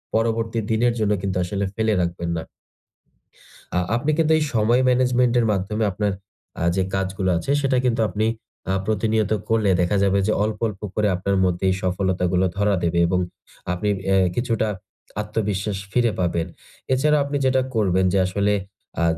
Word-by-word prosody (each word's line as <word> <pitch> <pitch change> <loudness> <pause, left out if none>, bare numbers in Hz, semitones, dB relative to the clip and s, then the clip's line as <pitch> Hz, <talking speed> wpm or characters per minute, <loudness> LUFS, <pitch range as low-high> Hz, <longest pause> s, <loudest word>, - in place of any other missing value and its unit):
পরবর্তী 115 0 0
দিনের 120 +2 +2
জন্য 105 -1 +1
কিন্তু 95 -1 -2
আসলে 100 +3 -2
ফেলে 110 -1 +1
রাখবেন 85 0 -2
না। 80 - -3 1.3
আ - - +1 0.2
আপনি 145 +6 0
কিন্তু 160 -1 +2
এই 155 - +1
সময় 115 +3 +3
ম্যানেজমেন্ট 125 -1 +3
এর 115 - +2
মাধ্যমে 105 +3 -1
আপনার 105 +2 -1 0.5
আ - - -1
যে 95 - +2
কাজগুলো 95 0 -1
আছে, 110 - -2
সেটা 135 -2 +1
কিন্তু 120 -2 +1
আপনি 110 +1 -1 0.5
আ - - +2
প্রতিনিয়ত 110 0 +1 0.2
করলে 110 -3 +2
দেখা 90 +4 +1
যাবে 100 0 +3
যে - - +2
অল্প, 105 0 -1
অল্প 100 -3 -7
করে 105 -1 +2
আপনার 95 +2 -1
মধ্যে 90 0 -1
এই 95 - +1
সফলতা 95 0 0
গুলো 90 +1 +3
ধরা 100 0 +2
দেবে 85 0 +1
এবং 90 +1 +1 0.5
আপনি 105 +4 -1 0.2
অ্যা 95 0 +3 0.2
কিছুটা 115 -3 0 0.5
আত্মবিশ্বাস 105 -2 -2
ফিরে 120 -2 +2
পাবেন। 85 -1 0 0.5
এছাড়াও 150 +3 +3
আপনি 145 0 -2
যেটা 130 0 +3
করবেন 95 -4 +2
যে - - +3
আসলে 100 +2 +1 0.5
আ - - +2
105 Hz, 170 wpm, -22 LUFS, 95-115 Hz, 1.3 s, সময়